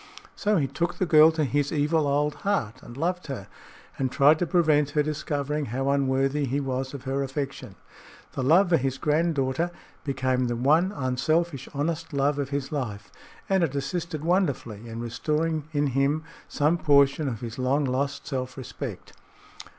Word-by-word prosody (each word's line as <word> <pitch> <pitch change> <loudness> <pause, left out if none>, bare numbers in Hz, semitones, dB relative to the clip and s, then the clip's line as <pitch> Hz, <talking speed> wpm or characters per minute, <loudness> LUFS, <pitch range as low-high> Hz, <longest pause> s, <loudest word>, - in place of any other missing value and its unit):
So 210 -1 +1
he 145 - +2
took 170 +5 -2
the 185 - 0
girl 155 -1 +7
to 160 -1 0
his 145 +1 0
evil 150 0 +1
old 145 +1 +1
heart, 150 - -1
and 120 - -11
loved 180 +4 -1
her, 130 -9 -5 0.5
and 130 -2 0
tried 150 +3 +5
to 175 - 0
prevent 155 -4 +3
her 150 - +5
discovering 150 -1 -2
how 135 +4 -2
unworthy 135 +1 +1
he 135 +2 -1
was 130 0 -3
of 135 - -8
her 135 +1 -1
affection. 140 0 -4 0.6
The - - -4
love 170 +8 +4
for 170 - +5
his 135 -1 -2
granddaughter 150 0 +1 0.3
became 130 -2 0
the 120 - -1
one 155 +10 +3
unselfish, 140 0 -1
honest 155 +2 -2
love 140 +1 +1
of 140 -2 -2
his 140 -1 -3
life, 125 -9 -4 0.4
and 190 -2 +2
it 145 -4 -1
assisted 155 +2 -3
wonderfully 135 - 0
in 115 0 -6
restoring 155 +6 -1
in 145 -1 +1
him 140 +3 +1 0.2
some 155 +3 +1
portion 140 0 +4
of 115 -5 -4
his 115 0 -6
long 135 +3 +1
lost 140 +2 -2
self 130 -1 -4
respect. 130 - -7
140 Hz, 170 wpm, -26 LUFS, 130-155 Hz, 0.6 s, girl